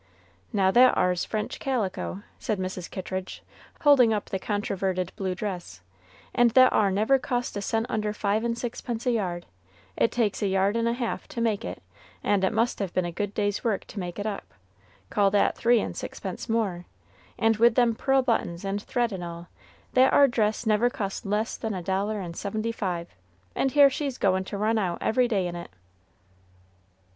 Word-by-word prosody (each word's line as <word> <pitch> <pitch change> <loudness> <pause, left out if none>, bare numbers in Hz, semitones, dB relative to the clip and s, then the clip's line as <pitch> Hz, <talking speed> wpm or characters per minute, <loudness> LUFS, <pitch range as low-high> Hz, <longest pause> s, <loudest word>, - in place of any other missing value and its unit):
Now, 190 -2 +3
that 250 +4 +6
ar's 180 -1 +1
French 215 -1 -3
calico!" 205 -6 -2 0.2
said 215 -4 -1
Mrs. 185 -1 -4
Kittridge, 185 0 -5 0.4
holding 270 -6 +6
up 210 - -3
the 190 - -1
controverted 190 -3 -2
blue 190 -2 -2
dress, 180 - -5 0.5
"and 240 -1 +5
that 255 0 +7
ar 205 -2 +3
never 215 +8 +3
cost 245 -2 -2
a 205 - -2
cent 225 +3 0
under 215 -3 -1
five 210 +1 0
and 235 0 -1
sixpence 240 0 -4
a 250 - +3
yard; 180 -6 -2 0.5
it - - +2
takes 225 -4 0
a 205 - +1
yard 195 +2 +2
and 230 0 +1
a 235 - +1
half 240 -1 -3
to - - -6
make 225 -3 0
it, - - -6 0.4
and 200 -2 +2
it 190 - +3
must 230 +2 0
have 195 -4 -2
been 185 - +1
a 175 - -3
good 205 +4 -4
day's 205 -1 -1
work 220 -5 0
to 210 - -8
make 175 -2 -5
it 205 - -4
up; 210 -2 -5 0.6
call 200 -2 +3
that 205 +1 +2
three 235 0 +3
and - - -4
sixpence - - -6
more, 200 -6 -1 0.5
and 225 -1 +2
with 230 +1 +5
them 240 -2 +4
pearl 270 +3 +2
buttons 205 -7 -1
and 195 +1 -2
thread 240 +1 -1
and 185 -3 -5
all, 170 0 -8 0.4
that 260 +1 +5
ar 280 - +6
dress 220 -2 0
never 220 +2 +3
cost 200 -5 -4
less 210 +2 0
than 220 -3 -3
a 180 - -5
dollar 200 +4 -1
and 175 -3 -6
seventy 215 +4 -2
five, 180 -6 -3 0.5
and 270 - 0
here 285 -1 +7
she's 275 -1 -3
goin' 190 -1 +2
to 200 +2 -6
run 220 +2 +1
out 180 -4 -1
every 245 +2 +2
day 200 -6 0
in 175 -1 -4
it!" 170 0 -7
210 Hz, 195 wpm, -26 LUFS, 190-235 Hz, 0.6 s, that